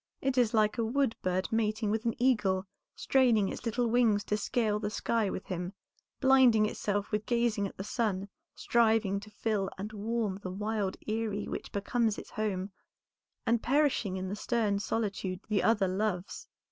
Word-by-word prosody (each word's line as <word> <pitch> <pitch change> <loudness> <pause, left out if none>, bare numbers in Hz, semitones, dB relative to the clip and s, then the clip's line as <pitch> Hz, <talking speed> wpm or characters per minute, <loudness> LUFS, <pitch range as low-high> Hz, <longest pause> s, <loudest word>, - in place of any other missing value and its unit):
It 270 -1 0
is 245 -4 +3
like 215 +1 +2
a - - +2
woodbird 225 -7 0
mating 215 -1 0
with 220 +2 -1
an 230 +2 -1
eagle, 210 -7 +2 0.3
straining 235 -7 +3
its - - -5
little 240 +2 0
wings 225 -3 +3
to 210 - -1
scale 215 0 0
the 210 0 -2
sky 215 0 0
with 185 - -5
him, 180 0 -4 0.5
blinding 260 -5 +5
itself 205 -1 -2
with 210 0 -1
gazing 235 -4 +1
at - - -13
the 195 - -4
sun, 200 -3 -1 0.3
striving 220 -4 +2
to 210 +1 -12
fill 210 -2 -1
and 210 +3 -6
warm 215 -2 -2
the 185 - -5
wild 205 0 -2
eyrie 215 -2 -2
which - - -5
becomes 220 +2 0
its - - -9
home, 200 -2 -2 0.7
and 230 -1 +2
perishing 265 -8 +1
in 185 0 -3
the 195 - -3
stern 210 -2 0
solitude 200 -4 -2
the 205 -3 +2
other 210 -4 +3
loves. 190 -1 -2
215 Hz, 170 wpm, -30 LUFS, 200-230 Hz, 0.7 s, blinding